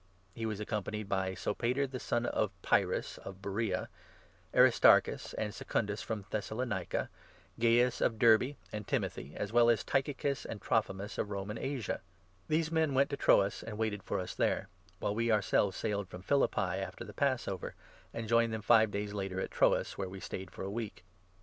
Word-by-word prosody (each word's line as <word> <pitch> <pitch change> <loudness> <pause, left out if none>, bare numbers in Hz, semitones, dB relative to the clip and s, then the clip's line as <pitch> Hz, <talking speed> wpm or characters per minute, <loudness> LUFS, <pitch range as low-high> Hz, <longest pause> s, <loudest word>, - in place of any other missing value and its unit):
He 115 +2 -3
was 105 -2 -3
accompanied 105 -1 -3
by 95 -1 -1
Sopater 125 +8 0
the 130 -1 -6
son 120 0 -1
of 100 -6 -1
Pyrrhus, - - +1
4 - - -17
of 95 0 -9
Beroea, 100 -1 -1 0.6
Aristarchus - - +5
and 105 -1 -2
Secundus 105 -2 -2
from 105 -3 -4
Thessalonica, 110 -3 -2 0.5
Gaius 120 +1 +3
of 115 - +2
Derbe, 115 +5 +5 0.2
and 105 -1 -5
Timothy, 70 - -2
as 105 +1 -4
well 120 0 +6
as 115 -2 +3
by - - -13
Tychicus 140 0 0
and 110 - -6
Trophimus 105 -4 -1
of 105 - -1
Roman 100 +2 -4
Asia. 135 -6 -3 0.5
These 160 +1 +1
men 160 -4 +2
went 140 +1 +3
to - - 0
5 - - -20
PaUl - - -7
Troas 100 0 +4
and 110 -2 -7
waited 110 -2 -1
for - - -2
us 90 - -4
there; - - 0 0.3
while 100 - -1
we 115 +2 0
our 110 -1 +5
6 100 - -7
at - - -8
Troas. - - -11
selves 100 -2 +3
sailed 100 -3 -2
from 90 - -9
Philippi 140 +6 +2 0.2
after - - -6
the - - -10
Passover, 130 -10 -1 0.4
and 115 -1 -5
joined 115 0 +3
them 110 -1 -4
five 110 -2 +6
days 100 0 -3
later 95 -2 -3
at - - -3
Troas, - - +2
where 95 -2 -2
we 95 +1 -8
stayed 95 0 -6
for - - -8
a 95 - -4
week. 110 -4 -5
110 Hz, 200 wpm, -32 LUFS, 100-120 Hz, 0.6 s, well